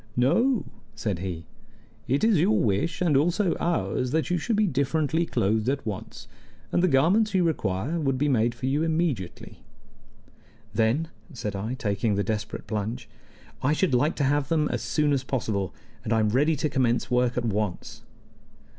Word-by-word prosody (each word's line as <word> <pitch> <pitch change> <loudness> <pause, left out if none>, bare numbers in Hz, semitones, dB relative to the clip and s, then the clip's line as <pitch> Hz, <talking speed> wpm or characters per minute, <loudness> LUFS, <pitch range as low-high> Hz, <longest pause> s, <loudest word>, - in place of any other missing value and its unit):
"No," 230 - +3 0.3
said 100 -6 -2
he. 90 -3 -5 0.6
"It 135 - +1
is 220 -6 +4
your 195 +7 +3
wish, 110 - 0
and 160 -5 +2
also 175 +6 +2
ours, 165 -6 0
that 160 +5 0
you 175 - +1
should 225 +7 -1
be 210 +1 +3
differently 155 +2 0
clothed 110 +4 +1
at 140 -2 -2
once, 105 -4 -6 0.4
and - - +2
the 185 - +4
garments 185 +9 +3
you 185 - +4
require 140 - -1
would 135 -4 0
be 145 +3 +1
made 120 -3 +2
for 120 - -5
you 140 +3 +1
immediately." 160 - -2 1.1
"Then," 115 +9 +1 0.2
said 105 -5 -4
I, 110 +6 -3
taking 105 -3 0
the 100 - 0
desperate 110 +1 -4
plunge, 110 +3 -4 0.5
"I 145 +3 +2
should 165 -2 +1
like 135 +6 +2
to 145 - -1
have 140 0 +1
them 155 -2 +2
as - - -2
soon 150 -2 +1
as 135 -2 0
possible, 110 -7 -2 0.3
and 110 - -4
I 115 - +3
am 110 -1 +2
ready 145 +8 +2
to 150 - 0
commence 125 -4 0
work 125 0 +2
at 120 - 0
once." 105 -4 -3
135 Hz, 175 wpm, -26 LUFS, 110-160 Hz, 1.1 s, is